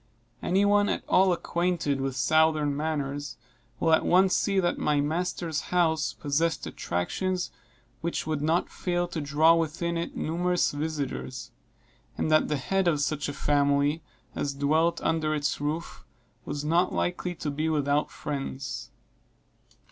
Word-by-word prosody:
Any 190 +3 +2
one 205 0 +4
at - - -1
all 190 0 +4
acquainted 170 -5 0
with 135 -1 -2
southern 155 +2 +3
manners, 145 -1 -3 0.4
will 165 -1 +3
at 160 - +4
once 185 +1 +4
see 195 -2 +1
that 175 -2 0
my 150 -1 +2
master's 160 +1 -1
house 160 -3 +2
possessed 155 +3 -1
attractions 180 - -2 0.5
which 170 +4 -2
would 155 -2 -2
not 160 +4 +1
fail 175 -1 -1
to 170 -2 -3
draw 150 +3 +4
within 170 +1 -1
it 170 - -5
numerous 175 +2 +1
visiters; 145 -3 -4 0.7
and 155 - 0
that 155 - +4
the 150 - 0
head 190 +7 0
of 155 -4 +2
such 145 0 -1
a - - -4
family 145 +2 +2 0.3
as 140 -1 -2
dwelt 160 +4 +2
under 155 -1 0
its 145 -2 -1
roof 155 +3 -3 0.4
was 145 0 -4
not 170 +4 +2
likely 180 0 -2
to 150 -2 -3
be 155 +3 -1
without 145 -1 +1
friends. 135 -3 -5
155 Hz, 145 wpm, -27 LUFS, 145-170 Hz, 0.7 s, one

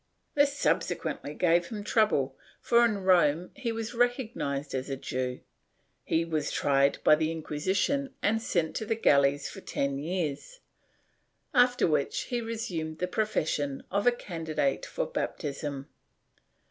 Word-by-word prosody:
This 285 -1 +3
subsequently 145 - -1
gave 170 0 +3
him 210 -3 -6
trouble, 175 - +2 0.2
for 235 0 +4
in 210 -4 +1
Rome 175 -2 +3
he 260 -4 -2
was 225 +1 -4
recognized 230 - -1
as 130 +1 -3
a 135 - -1
Jew, 125 -1 -3 0.6
he 165 +1 +1
was 155 -3 -1
tried 140 0 +2
by - - +7
the 155 +1 +2
Inqui 165 -1 -4
sition 200 - +1
and 225 +2 +1
sent 170 -8 -1
to 220 - -3
the 225 - +1
galleys 140 -8 +3
for - - -9
ten 140 0 -2
years, 170 - -3 0.9
after 245 -1 +4
which 150 -4 +1
he 245 -2 -3
resumed 180 -9 -4
the 180 - -1
profession 155 -9 -1
of 200 +4 +1
a - - +8
candidate 160 - -2
for - - -2
baptism. 140 -1 -4
170 Hz, 145 wpm, -29 LUFS, 145-225 Hz, 0.9 s, a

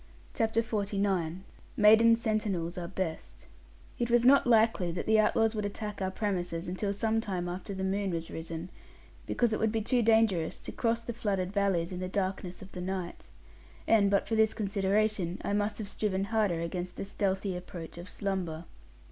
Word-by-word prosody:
CHAPTER 225 0 +1
XLIX 200 -5 -1 0.4
MAIDEN 220 +2 +7
SENTINELS 210 -7 -1
ARE 175 -1 -4
BEST 185 -3 -5 0.5
It 240 -1 0
was 240 0 +4
not 275 0 +6
likely 220 -6 +3
that 175 - -4
the 220 0 +4
outlaws 225 +1 +3
would 210 -1 -2
attack 205 0 -5
out 190 0 -2
premises 180 -4 -2
until 185 +3 -2
some 220 +2 0
time 185 -5 -3
after 185 +3 -5
the 190 - -3
moon 195 +1 0
was 165 -2 -3
risen; 165 +2 -6 0.6
because 240 -2 +1
it - - -1
would 220 -1 +2
be 220 -1 -1
too 245 +2 +2
dangerous 220 -7 +2
to - - -6
cross 230 -1 0
the 235 - -4
flooded 195 -4 -2
valleys 195 -4 +1
in 180 - -4
the 185 0 -3
darkness 190 -2 -3
of 195 - -13
the 180 - -6
night. 185 - -5 0.6
And 205 -3 +4
but 200 -1 +2
for - - -3
this 220 -1 +3
consideration, 200 -2 0
I - - -1
must 205 +1 0
have 215 - -4
striven 195 -1 -1
harder 200 -5 +1
against 175 +2 -4
the - - -5
stealthy 195 -1 -1
approach 175 -2 -8
of 175 - -7
slumber. 180 -5 -3
200 Hz, 180 wpm, -30 LUFS, 180-220 Hz, 0.6 s, MAIDEN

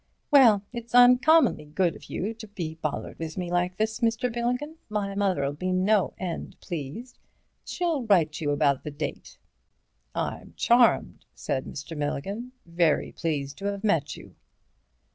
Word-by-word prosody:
"Well, 235 -8 +6
it's 235 0 -5
uncommonly 250 - +6
good 170 +3 0
of - - -13
you 210 +5 -3
to 225 -1 -11
be 175 -6 -5
bothered 160 -2 -5
with 160 +1 -5
me 175 -2 -3
like 180 +1 0
this, 220 0 -1
Mr. 230 +1 0
Milligan, 250 +7 -2
my 205 -2 -2
mother'll 185 -9 0
be 185 +5 -3
no 190 +2 +2
end 180 -3 -5
pleased. 175 - -7 0.5
She'll 335 -6 -1
write 165 -7 +3
you 150 - -1
about 140 -2 +2
the - - -4
date." 145 +1 -6 0.8
"I'm - - -4
charmed," - - +3
said 130 -1 -3
Mr. 145 +3 -7
Milligan, 195 - -3
"very 170 -2 +1
pleased 145 -4 -3
to 200 - -6
have 200 0 -3
met 160 -9 +1
you." - - -13
185 Hz, 150 wpm, -26 LUFS, 155-225 Hz, 0.8 s, Well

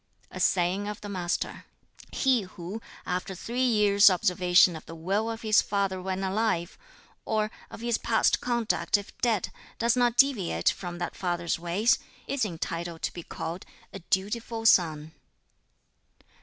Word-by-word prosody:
A - - -7
saying 185 +3 +1
of 210 -1 -5
the 205 - -7
Master: 180 -2 -3 0.5
"He 260 -4 +2
who, 185 +3 -8 0.2
after 185 +1 -3
three 240 +7 -3
years' 210 -3 +6
observation 180 -2 +4
of 160 - -8
the 165 - -8
will 195 +7 -1
of 225 0 -6
his 215 -1 +5
father 195 -2 -1
when 190 +1 -3
alive, 190 -3 0 0.5
or 215 0 -1 0.2
of - - -10
his 235 -1 0
past 225 -1 +2
conduct 235 -3 +1
if 205 - -10
dead, 225 -5 0 0.3
does 235 +1 +2
not 245 -1 +2
deviate 200 - +3
from 175 -2 -7
that 175 - -4
father's 175 -2 -2
ways, 195 +9 +2 0.3
is 275 -3 -1
entitled 170 -2 -5
to - - -1
be 175 - -7
called 170 +2 -6 0.3
'a 195 - -6
dutiful 225 +5 -2
son.'" 160 -7 +3
195 Hz, 150 wpm, -27 LUFS, 175-225 Hz, 0.5 s, years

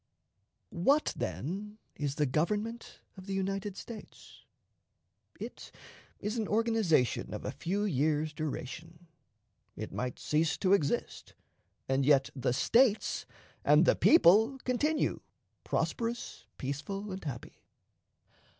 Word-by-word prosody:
What, 275 - +2
then, 185 - -4 0.2
is 145 -2 -2
the 150 - +2
Government 210 - -2 0.2
of 190 +1 -11
the 195 - -2
United 195 0 -2
States? 225 -3 -11 0.9
It - - -8 0.5
is 215 +3 -2
an 215 - -1
organization 215 - +2
of - - -7
a - - -2
few 200 +4 -2
years' 155 -3 +1
duration. 160 +2 -6 0.7
It - - -6
might 125 0 -3
cease 155 +1 +1
to 190 0 +3
exist, 155 -8 -1 0.5
and 135 +1 +2
yet 135 -1 +4
the 125 -2 0
States 230 - +2 0.4
and - - +6
the - - +5
people 225 - +6
continue 295 +5 0 0.4
prosperous, 235 0 -2
peaceful, 170 +10 -4
and 190 +1 -6
happy. 130 -6 -7
185 Hz, 115 wpm, -31 LUFS, 150-215 Hz, 0.9 s, and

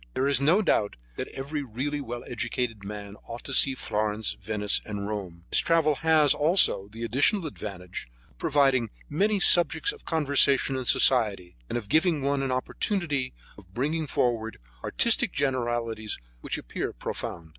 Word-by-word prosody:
There 130 - +1
is 140 0 +3
no 170 +10 +4
doubt 105 - +1 0.2
that - - -3
every 145 +3 -5
really 140 +4 -3
well 120 -2 -6
educated 120 -2 -3
man 100 0 -8
ought 115 +1 -7
to 135 - -5
see 135 0 +5
Florence, 105 -2 -1
Venice 105 -1 -1
and 100 -2 -5
Rome. 95 -5 -6
This - - +4
travel 165 -2 +3
has, 155 -2 +4
also, 150 - +3
the 110 +3 -8
additional 145 - +2
advantage 95 - -7 0.2
of - - -29
providing 135 -5 +2 0.2
many 200 +7 +1
subjects 175 - +5
of 440 - -14
conversation 140 -3 +2
in 130 -1 -3
society, 105 -10 +3
and - - -1
of 110 -4 -6
giving 160 - +2
one 140 0 +1
an 135 - -1
opportunity 140 0 -1 0.2
for 100 - -15
bringing 150 +5 -1
forward 115 -4 -1 0.3
artistic 235 -2 +1
generalities 120 -5 -1 0.2
which - - -3
appear - - -4
profound. 80 -1 -6
130 Hz, 155 wpm, -27 LUFS, 110-150 Hz, 0.3 s, see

